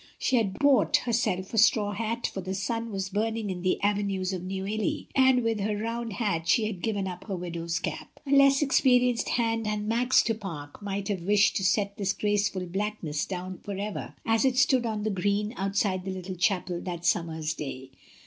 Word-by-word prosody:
She 260 - +1
had 200 -5 0
bought 280 -7 +4
herself 220 -6 0
a 225 - +3
straw 210 -1 +4
hat, 230 +3 -2
for 195 - -3
the 190 +1 -4
sun 230 +4 -2
was 195 -1 -3
burning 220 +1 -1
in 180 -1 -5
the 185 0 +1
avenues 200 -2 0
of 185 - -3
Neuilly, 195 +3 -2
and 260 -2 +5
with 225 -2 0
her 205 +1 -1
round 230 +1 -3
hat 195 -8 -1
she 220 - +3
had 205 -5 -4
given 205 -2 -1
up 180 0 -7
her 200 - -3
widow's 170 -1 -3
cap. - - -5
A 280 - -4
less 275 0 +6
experienced 250 -4 +3
hand 225 -2 0
than 210 0 -2
Max 245 +3 +3
du 225 - +1
Pare 165 -9 -7
might 200 -1 -3
have 195 -4 -1
wished 205 +3 +3
to 195 - -2
set 200 +1 +1
this 200 -1 0
graceful 205 -3 0
blackness 180 -5 -3
down 185 0 -5
for 200 -2 -6
ever 205 +1 -5
as 225 -1 +2
it 260 -2 +2
stood 255 -2 +3
on 215 -2 -2
the 215 - 0
green 205 +3 0
outside 195 -1 0
the 190 - -5
little 185 0 -5
chapel 180 0 0
that 175 -2 -5
summer's 160 -2 0
day. 135 -2 -7
205 Hz, 200 wpm, -27 LUFS, 185-225 Hz, -, less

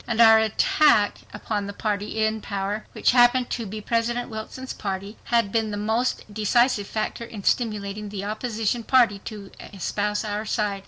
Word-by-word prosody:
And 235 -1 -2
our 225 -1 +8
attack 220 +1 +3
upon 210 -1 -3
the 200 - -6
party 210 +1 -1
in 220 0 -1
power, 200 +1 -3
which - - +2
happened 245 0 +4
to 230 -3 -3
be 215 +2 -6
President 235 +2 -1
Wilson's 220 +4 -6
party, 195 +1 -5
had 230 -4 +1
been 225 -1 0
the 205 - -4
most 220 +4 0
decisive 215 0 +2
factor 215 +2 -3
in 220 -3 -8
stimulating 210 -3 -1
the 200 -1 -5
opposition 220 +1 -2
party 230 -5 +3
to 205 -3 -8
espouse 210 +2 -3
our 210 0 -2
side. 210 -2 -1
215 Hz, 165 wpm, -24 LUFS, 205-230 Hz, -, our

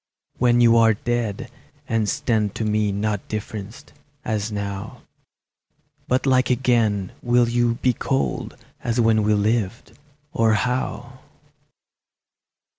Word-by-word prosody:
When 120 -1 +4
you 115 -1 +6
are 115 -1 +5
dead, 120 -2 -3 0.4
and 110 -2 0
stand 105 -3 0
to 110 - -2
me 105 -1 +1
Not 105 0 -2
differenced, 110 +2 -7 0.3
as 110 -1 -2
now, 100 0 -5 1.0
But 130 +2 +1
like 130 -1 +3
again, 115 -6 +1
will 120 0 +3
you 120 0 +1
be 125 - +3
cold 135 +3 -2 0.3
As 120 0 -1
when 110 -2 +3
we 105 0 +2
lived, 110 +1 -1 0.4
or 115 -1 +2
how? 125 +2 -3
115 Hz, 115 wpm, -22 LUFS, 105-120 Hz, 1.0 s, you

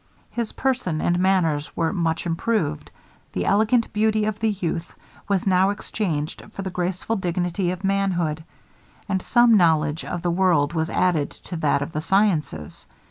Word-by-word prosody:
His 235 -2 -3
person 250 -12 -1
and 175 +2 +1
manners 175 -6 +1
were 165 -1 +1
much 165 -3 -1
improved; 175 - -1 0.4
the - - -2
elegant 220 +3 +2
beauty 215 0 +2
of 215 -1 -2
the 220 0 +1
youth 175 -4 -3 0.3
was 195 -2 0
now 190 0 +4
exchanged 175 -6 -3
for 195 - -5
the 190 - -4
graceful 180 +4 -2
dignity 180 0 -1
of 180 +1 -4
manhood, 180 -6 0 0.6
and 190 -2 0
some 240 +1 +5
knowledge 160 -4 +3
of 175 -1 -5
the 175 - +1
world 170 -4 +2
was 160 -1 -1
added 170 -7 +1 0.2
to - - -2
that 145 -3 +1
of 155 - -7
the 155 - -3
sciences. 160 - 0
180 Hz, 160 wpm, -23 LUFS, 160-200 Hz, 0.6 s, some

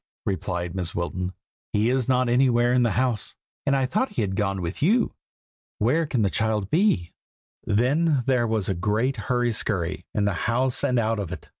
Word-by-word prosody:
replied 90 -3 -2
Mrs. 90 -3 -4
Wilton. 90 +1 -3 0.4
"He 110 +3 +2
is 130 -1 0
not 130 -1 +3
anywhere 120 -1 +3
in 125 - +4
the 120 -4 +2
house, 125 -4 0 0.3
and 140 - +4
I 135 -1 +2
thought 215 - -1
he 115 - 0
had 95 -2 -2
gone 95 -1 0
with 85 +1 -4
you. 220 - +3 0.6
Where 150 +9 +2
can 125 -6 0
the 100 - +1
child 110 -3 0
be?" 155 - +2 0.5
Then 135 +6 +2
there 125 -3 +2
was 110 -3 -1
a 95 - +1
great 110 +9 0
hurry 120 +2 0
scurry, 95 -5 -2
in 105 - +2
the 100 - +1 0.2
house 125 +2 +1
and 125 - +2
out 115 -1 +1
of 100 -5 -4
it. - - -8
115 Hz, 190 wpm, -25 LUFS, 100-130 Hz, 0.6 s, in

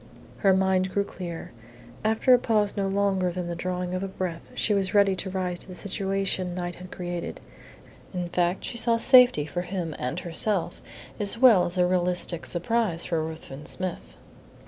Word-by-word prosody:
Her 195 - +4
mind 190 0 +2
grew 200 - +1
clear. 175 -4 -7 0.5
After 220 +4 +4
a 250 - +6
pause 215 -4 +1
no 200 -2 0
longer 195 -2 +1
than 180 0 -4
the 170 0 -4
drawing 180 +1 -3
of 185 - -2
a 195 - -2
breath 185 -3 -5
she 210 - +1
was 200 +1 0
ready 200 -2 +5
to 190 - -4
rise 180 -2 -2
to - - -5
the 185 - -9
situation 195 -2 -1
Knight 175 -1 -3
had 185 0 -10
created. 175 -1 -5 0.7
In 180 -2 -3
fact, 175 +1 0
she 235 - -3
saw 235 -1 +2
safety 250 - +6
for 155 +4 -3
him 175 -3 -4
and 125 - -2
herself, 180 +2 -1 0.4
as 205 +2 +1
well 230 -7 +6
as 175 +2 -4
a 180 - +4
realistic 180 -1 0
surprise 180 -1 0
for 165 -2 -1
Ruthven 155 -2 -8
Smith. 175 - -5
185 Hz, 180 wpm, -26 LUFS, 175-200 Hz, 0.7 s, a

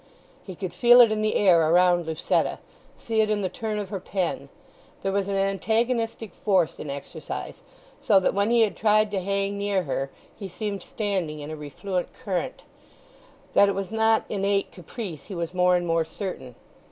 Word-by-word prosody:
He 185 - -9
could 180 -1 -5
feel 240 +6 +6
it 230 -2 +6
in 215 0 0
the 215 0 0
air 170 -6 +4
around 175 0 +4
Lucetta, 160 -1 0 0.4
see 225 -1 0
it 215 - +1
in 210 -1 0
the 185 - 0
turn 215 +3 -4
of 205 -2 -4
her 195 -2 -4
pen. 185 -1 -3 0.5
There 195 - 0
was 200 0 0
an 200 - -1
antagonistic 225 +2 0
force 190 -6 +1
in 150 - -6
exercise, 140 0 -7 0.4
so 205 -6 +5
that 190 - +1
when 200 +2 +1
he 235 0 +4
had 210 -6 +2
tried 215 0 +3
to 200 - 0
hang 200 +1 -1
near 200 -2 0
her 135 -2 -2 0.3
he 200 -3 -7
seemed 200 +1 -4
standing 190 -9 -3
in 150 +1 -7
a - - -4
refluent 175 +5 -4
current. 205 +6 -4 0.9
That 200 - +6
it 200 - -1
was 195 0 -4
not 220 0 +2
innate 200 0 0
caprice 180 - -8
he 195 - -7
was 170 0 -4
more 180 0 +3
and 175 0 0
more 165 -1 +1
certain. 160 - -7
195 Hz, 190 wpm, -25 LUFS, 175-215 Hz, 0.9 s, feel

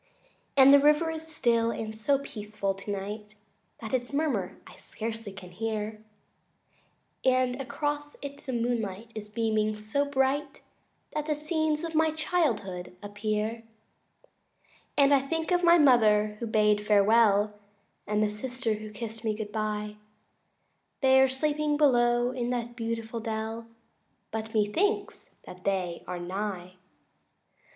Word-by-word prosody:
II - - -35 0.3
And 275 +1 +8
the 285 - +9
river 300 +3 +4
is 320 0 -5
still, 235 -7 +2
and 220 -1 -4
so 275 +6 +2
peaceful 210 -6 -4
tonight 205 +2 -6 0.5
That 220 +1 -6
its 245 0 -1
murmur 260 - -1
I - - -13
scarcely 225 -1 -6
can 185 -2 -11
hear, 215 +2 -3 1.2
And 255 0 +2
across 290 +2 -3
it 280 0 -7
the 265 - -3
moonlight 230 -3 -2
is 210 -1 -7
beaming 215 -1 0
so 215 +7 -1
bright 280 +1 -1 0.5
That 300 0 -2
the 305 - +1
scenes 310 0 -1
of 330 -1 -4
my 320 0 +3
childhood 240 - -1
appear. 210 +1 -1
III 230 - -18 1.3
And 280 0 +5
I 275 - +5
think 325 +3 -2
of 355 0 +2
my 340 0 +7
mother 215 -7 +4
who 235 - -3
bade 210 -1 +3
me - - -8
farewell 210 0 +4 0.5
And 210 0 +1
the 210 - +1
sister 240 +2 -2
who 215 0 -6
kist 225 +1 -7
me 215 -1 0
good 210 -1 -6
bye 210 -1 -3 1.0
They 265 -1 +6
are 265 - +6
sleeping 295 +2 0
below 240 -4 +3
in 245 -2 -3
that 240 -1 -3
beautiful 230 -1 -3
dell 225 0 -4 0.6
But 220 0 -5
methinks 390 - 0
that 180 - -10
again 180 - -22
they 185 -3 -1
are 180 - -4
nigh. 185 0 -4
230 Hz, 145 wpm, -28 LUFS, 210-280 Hz, 1.3 s, the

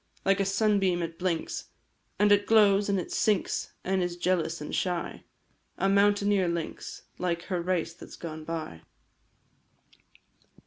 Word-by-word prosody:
Like 195 0 +3
a 195 - +2
sunbeam 195 -3 +2
it 165 0 -6
blinks, 175 -3 -2 0.5
And 205 0 +4
it 205 0 +4
glows, 205 -2 +5
and 195 -1 +2
it 180 - -6
sinks, 210 -3 0
And 190 0 +1
is 175 -1 -2
jealous 175 -2 0
and 150 - -6
shy! 180 -2 -2 0.5
A 195 - +1
mountaineer 200 -1 +3
lynx, 170 -1 -4 0.2
Like 170 -1 -1
her 180 -3 -2
race 170 -2 -1
that 175 - -12
's - - -10
gone 160 -2 -7
by. 155 - -5
185 Hz, 145 wpm, -28 LUFS, 170-200 Hz, 0.5 s, glows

